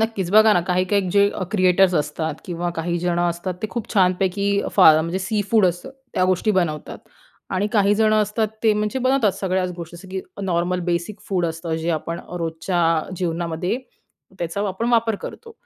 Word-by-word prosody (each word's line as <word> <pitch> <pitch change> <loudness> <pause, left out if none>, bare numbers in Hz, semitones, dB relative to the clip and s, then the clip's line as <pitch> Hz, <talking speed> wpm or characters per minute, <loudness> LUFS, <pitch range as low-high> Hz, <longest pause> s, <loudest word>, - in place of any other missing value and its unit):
नक्कीच, 215 -5 -1
बघा 215 +1 +6
ना 175 - +3
काही-काही 185 +1 +1
जे 200 +1 +4 0.2
क्रिएटर्स 185 -1 +4
असतात 150 +1 -1
किंवा 175 0 -3
काहीजणं 175 +1 0
असतात 175 +2 -4
ते - - 0
खूप 235 -1 -5
छानपैकी 195 +2 +2
फा 185 -5 +8
म्हणजे 170 +4 -2
सीफूड 205 +1 +1
असतं, 175 +9 -3 0.2
त्या 185 - +2
गोष्टी 185 +3 +1
बनवतात. 170 -7 -1 0.5
आणि 195 +2 0
काहीजणं 215 +1 +3
असतात 210 +1 -1
ते 220 -1 +4
म्हणजे 210 +5 -1
बनवतात 255 -5 +2
सगळ्याच 185 -1 0
गोष्टी 170 0 -8
जसं, 190 +2 -13
की 190 0 -4 0.2
नॉर्मल 180 0 0
बेसिक 170 +4 -3
फूड 180 -3 +1
असतं 165 0 -4
जे 165 +1 -2
आपण 165 +1 -3 0.2
रोजच्या 165 +2 -2 0.3
अ, - - -9
जीवनामध्ये 170 +2 -2 0.6
त्याचा 170 +3 -3
आपण 210 +5 -2
वापर 230 -2 +2
करतो. 460 -1 -9
185 Hz, 165 wpm, -22 LUFS, 170-205 Hz, 0.6 s, फा